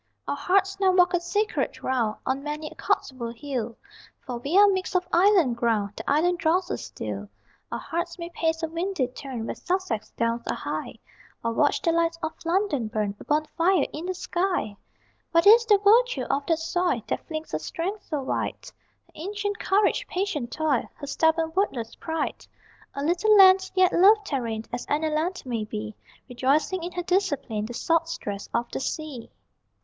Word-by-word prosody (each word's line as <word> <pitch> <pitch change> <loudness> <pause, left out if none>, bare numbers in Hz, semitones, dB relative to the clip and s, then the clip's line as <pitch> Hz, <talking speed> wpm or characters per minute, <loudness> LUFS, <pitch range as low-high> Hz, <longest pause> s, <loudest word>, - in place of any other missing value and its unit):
Our - - -1
hearts 390 +1 +1
now 380 -1 +4
walk 360 0 +4
a 355 - +3
secret 410 +5 -1
round 235 -5 0
On 265 +1 -1
many 300 +1 -4
a - - -10
Cotswold 235 -3 -2
hill, 240 -4 -4 0.5
For 245 -2 -4
we 285 +9 0
are 410 0 +8
mixed 380 -1 -1
of 360 0 +1
island 350 - +4
ground, 215 -4 0
The 220 - -5
island 340 +5 +2
draws 350 +3 +1
us - - -3
still: 100 -2 -6 0.4
Our 235 - -2
hearts 340 +7 -4
may 340 -1 -6
pace 325 -1 -1
a - - +1
windy 335 -2 -1
turn 250 -3 -6
Where - - -3
Sussex 360 - -2
downs 230 0 0
are - - 0
high, - - -4 0.5
Or 230 0 0
watch 290 +5 +2
the 335 - +3
lights 335 0 +1
of 320 - -2
London 335 - 0
burn, 210 -2 -2
A - - -9
bonfire 310 +3 +2
in 325 +4 -5
the 370 - -2
sky! 355 - -1 0.6
What 335 +2 +4
is 460 +3 +7
the 415 -3 +6
virtue 465 +5 +4
of 280 0 -1
that 330 - +2
soil 335 - 0
That - - -3
flings 315 -1 -5
her - - -1
strength 385 +6 -4
so 295 -4 -2
wide? - - -2 0.5
Her - - -28
ancient 410 +4 -4
courage, 415 +5 +2
patient 360 -10 -2
toil, 305 -5 0
Her - - -8
stubborn 320 +2 +1
wordless 245 - -1
pride? 320 -2 -4 0.5
A 280 - -3
little 360 +7 +4
land, 380 -1 +7
yet 370 0 +4
loved 410 +2 +5
therein 230 -5 -2
As - - -4
any 310 +2 +1
land 335 +4 -1
may 235 -4 -2
be, 105 - -6 0.3
Rejoicing 275 +8 +1
in 350 +2 -5
her 355 - -3
discipline, 285 - 0
The 240 - -7
salt 330 +3 +1
stress 205 -11 -5
of 235 +1 0
the - - -3
sea. 275 -4 -5
320 Hz, 185 wpm, -26 LUFS, 255-370 Hz, 0.6 s, are